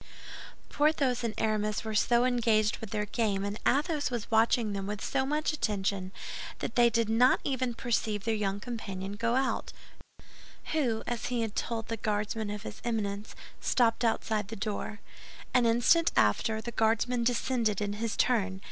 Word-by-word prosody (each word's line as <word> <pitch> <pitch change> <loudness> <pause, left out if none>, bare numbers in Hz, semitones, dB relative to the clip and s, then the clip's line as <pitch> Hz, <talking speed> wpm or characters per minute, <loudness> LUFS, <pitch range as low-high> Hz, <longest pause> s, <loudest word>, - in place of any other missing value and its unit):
Porthos 285 -5 +1
and 230 -2 -2
Aramis 215 0 0
were 220 -1 -4
so 240 +3 +3
engaged 225 -4 +2
with 225 - -7
their 210 +1 -1
game, 205 -2 -1
and 205 +1 -4
Athos 295 +1 +1
was 240 -2 -4
watching 225 -1 +3
them 195 -1 -3
with 210 0 -3
so 265 -1 0
much 300 +2 0
attention, 195 -7 -1 0.5
that - - -4
they 240 -1 +6
did 230 -1 +1
not 235 +4 +4
even 255 -3 -1
perceive 220 -4 -1
their 225 - 0
young 200 -2 -1
companion 200 -4 -5
go 230 +3 0
out, 265 0 -1 1.0
who, 250 -8 0
as 240 -2 -3
he 245 -1 -1
had 220 -2 -3
told 225 -1 -2
the 230 - -3
Guardsman 210 0 -2
of 210 0 -5
his - - -8
Eminence, 210 -3 -3 0.2
stopped 235 -1 +2
outside 220 -2 0
the 225 - -6
door. 210 0 -4 0.5
An 245 -2 +4
instant 285 +9 +4
after, 220 - +2
the 235 - -5
Guardsman 230 +2 +1
descended 235 -3 +1
in 205 -1 -2
his 220 +1 -3
turn. 200 -6 +1
225 Hz, 165 wpm, -30 LUFS, 210-245 Hz, 1.0 s, they